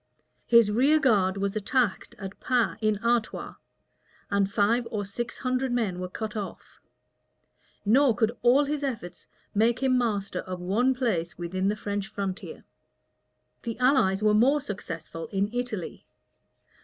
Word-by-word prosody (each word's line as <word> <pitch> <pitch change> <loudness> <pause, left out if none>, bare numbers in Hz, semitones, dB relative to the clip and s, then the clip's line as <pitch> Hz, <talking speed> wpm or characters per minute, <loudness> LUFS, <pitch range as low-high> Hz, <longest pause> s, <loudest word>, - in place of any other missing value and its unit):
His 235 -3 +6
rear 275 +8 +4
guard 200 -9 +3
was 195 +1 -1
attacked 215 0 0
at 195 -1 -8
Pas, 245 -3 +1
in 215 -1 +2
Artois, 235 -2 0 0.8
and 200 -1 +1
five 230 +4 +2
or 205 -2 -3
six 235 +5 -5
hundred 255 0 -1
men 215 -7 -1
were 180 0 -4
cut 215 +3 -5
off; 205 -3 -7 1.1
nor 250 +3 +4
could 220 +1 +2
all 255 +4 +5
his 290 0 -2
efforts 225 -10 -5 0.3
make 230 +5 +2
him 260 -1 +3
master 205 -5 -1
of 185 -1 -6
one 225 +9 +1
place 195 -10 -1
within 185 +2 -2
the 205 - +1
French 205 -2 -3
frontier. 200 -2 -5 1.0
The 230 -2 -5
allies 250 -6 +3
were 210 0 +4
more 260 +8 +4
successful 165 - -6
in 200 +1 -1
Italy. 245 -7 -4
215 Hz, 145 wpm, -27 LUFS, 195-245 Hz, 1.1 s, His